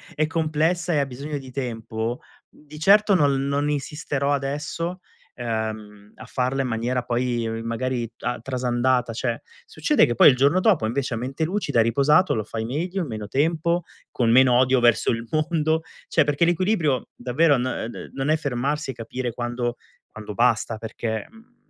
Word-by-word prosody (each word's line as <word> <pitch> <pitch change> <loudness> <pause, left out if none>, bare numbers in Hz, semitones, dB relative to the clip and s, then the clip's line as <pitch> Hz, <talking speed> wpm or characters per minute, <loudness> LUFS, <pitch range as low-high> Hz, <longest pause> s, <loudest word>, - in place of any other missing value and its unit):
è 155 - +2
complessa 160 +2 0
e 150 - +2
ha 140 - +1
bisogno 140 +3 -6
di 130 -2 -10
tempo, 120 0 -4 0.3
di 150 0 -14
certo 205 +5 +5
non 145 -6 +4
l 135 - 0
non 140 +1 0
insisterò 145 -1 -1
adesso, 150 +6 -3 0.4
ehm, 110 -3 -5
a 125 - -11
farla 130 +2 -1
in - - -2
maniera 120 +2 -1
poi 120 -2 -1
magari 120 +1 -2
t - - -22
a 125 - -2
trasandata 125 -1 0
cioè. 120 +1 -2 0.2
Succede 325 -9 +2
che 120 - -1
poi - - +8
il 130 - +3
giorno 140 +8 +3
dopo 185 - +3
invece 130 +2 -2
a - - -2
mente 130 +6 -3
lucida, 160 - +1
riposato, 140 +10 +3
lo 110 - -1
fai 110 +1 -5
meglio, 175 +10 -2
in 165 - -3
meno 110 -4 -6
tempo, 165 +6 +1 0.3
con 115 -2 +1
meno 130 +1 +6
odio 130 0 +4
verso 120 0 +3
il 115 0 -2
mondo. 160 +2 0 0.2
Cioè 155 - +3
perché 145 +2 0
l'equilibrio 170 - +1
davvero, 140 +4 +2
no 125 +1 -1
uhm, - - -3
d - - -8
non 135 +2 -2
è 155 - +4
fermarsi 140 +1 -2
e - - -9
capire 120 +1 -4
quando 120 0 -3 0.4
quando 105 -1 -8
basta 115 -1 +1
perché, 110 0 -4
mhmm, 225 +3 -20
130 Hz, 180 wpm, -23 LUFS, 120-155 Hz, 0.4 s, poi